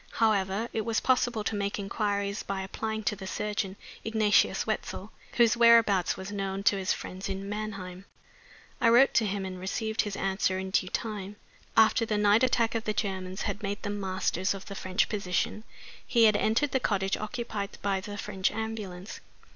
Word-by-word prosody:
However, 210 -1 +1
it 220 - 0
was 225 0 0
possible 245 -4 +1
to 215 - -2
make 200 0 -1
inquiries 200 0 -1
by 195 -1 -3
applying 220 +3 -4
to 210 - 0
the 190 -1 -8
surgeon, 205 -1 -2 0.3
Ignatius 220 -2 +3
Wetzel, - - -4 0.2
whose 235 -1 +4
whereabouts 230 -6 +5
was 190 +1 -6
known 195 -1 -3
to 205 - +4
his 190 -1 -1
friends 190 +2 -4
in 195 0 -4
Mannheim. 195 -3 -5 0.8
I 230 - +5
wrote 245 +4 +6
to 220 - +3
him, 195 -1 -2
and 185 -1 -6
received 220 +4 -1
his 205 -2 -4
answer 190 -1 0
in 190 0 -4
due 185 -1 +1
time. 210 -2 -4 0.4
After 220 +1 +5
the 215 -2 0
night 210 +2 +4
attack 235 -3 +2
of 225 -1 -2
the 215 - 0
Germans 190 -2 -3
had 210 - -3
made 200 0 -4
them 205 -1 -3
masters 190 0 -1
of 195 - -9
the 200 - -7
French 185 +1 0
position, 205 +1 -2 0.4
he 235 -2 +4
had 215 -2 +6
entered 225 +7 +2
the 265 - +2
cottage 195 -5 0
occupied 215 -2 -4
by 195 -1 0
the 205 0 -7
French 195 -2 -1
ambulance. 210 -4 -5
205 Hz, 180 wpm, -29 LUFS, 190-220 Hz, 0.8 s, wrote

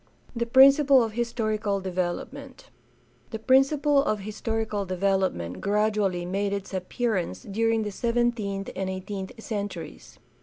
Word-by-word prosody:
The 235 0 -1
principle 270 +1 +6
of 225 - -3
historical 215 -3 -1
development. 185 -2 -5 0.3
— - - -35
The 220 - -4
principle 275 +5 +3
of 215 -6 -1
historical 215 0 -3
development 185 - -1
gradually 205 -4 0
made 195 +2 -1
its 200 0 -5
appearance 185 - -2
during 225 +2 0
the 210 - -4
seventeenth 230 -3 -1
and 190 0 -2
eighteenth 190 +1 -5
centuries. 190 - -6
210 Hz, 120 wpm, -26 LUFS, 190-230 Hz, 0.3 s, principle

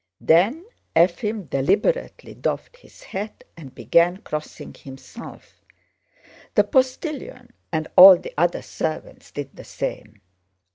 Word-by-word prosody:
Then 210 - +2 0.3
Efím 180 +4 +1
deliberately 195 - -1
doffed - - -4
his - - -19
hat 205 +3 -7
and 135 -6 -12
began 175 +2 +2
crossing 155 -5 -7
himself. 135 -1 -13 0.9
The - - +5
postilion 260 -2 -2 0.2
and 155 -1 -2
all 185 0 +11
the - - -10
other 175 +3 0
servants 155 -1 -5
did 145 -2 -8
the - - -11
same. 110 - -6
175 Hz, 110 wpm, -22 LUFS, 155-235 Hz, 0.9 s, all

